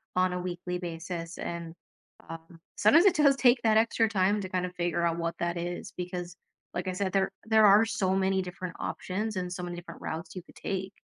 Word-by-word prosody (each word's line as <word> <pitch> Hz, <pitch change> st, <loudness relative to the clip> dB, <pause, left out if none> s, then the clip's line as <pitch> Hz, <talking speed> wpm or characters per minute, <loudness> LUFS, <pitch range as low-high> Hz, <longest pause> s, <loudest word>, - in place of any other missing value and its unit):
on 185 Hz, 0 st, +3 dB
a 180 Hz, -, -2 dB
weekly 180 Hz, 0 st, -4 dB
basis, 170 Hz, 0 st, -6 dB
and, 170 Hz, -1 st, -5 dB, 0.5 s
um, 165 Hz, 0 st, -10 dB, 0.2 s
sometimes 300 Hz, -, +6 dB
it 395 Hz, -, +5 dB
does 280 Hz, -2 st, +5 dB
take 250 Hz, -2 st, +4 dB
that 220 Hz, -1 st, +4 dB
extra 225 Hz, 0 st, +3 dB
time 205 Hz, 0 st, +2 dB
to 190 Hz, -, -4 dB
kinda 180 Hz, -1 st, -2 dB
figure 175 Hz, 0 st, 0 dB
out 170 Hz, 0 st, 0 dB
what 165 Hz, 0 st, -3 dB
that 170 Hz, 0 st, -1 dB
is 175 Hz, +1 st, -4 dB
because, 180 Hz, -1 st, -5 dB, 0.4 s
like 180 Hz, +1 st, -3 dB
I 185 Hz, -, -1 dB
said, 190 Hz, 0 st, -1 dB
there 195 Hz, -1 st, +2 dB
there 220 Hz, -1 st, +5 dB
are 205 Hz, +2 st, +7 dB
so 190 Hz, -4 st, 0 dB
many 190 Hz, 0 st, +2 dB
different 180 Hz, -1 st, -6 dB
options 210 Hz, +3 st, -3 dB
and 180 Hz, -1 st, -3 dB
so 180 Hz, -, -5 dB
many 175 Hz, 0 st, -5 dB
different 170 Hz, -1 st, -10 dB
routes 160 Hz, +4 st, -5 dB
you 185 Hz, -, -6 dB
could -, -, -19 dB
take. 190 Hz, 0 st, -4 dB
180 Hz, 210 wpm, -29 LUFS, 175-200 Hz, 0.5 s, are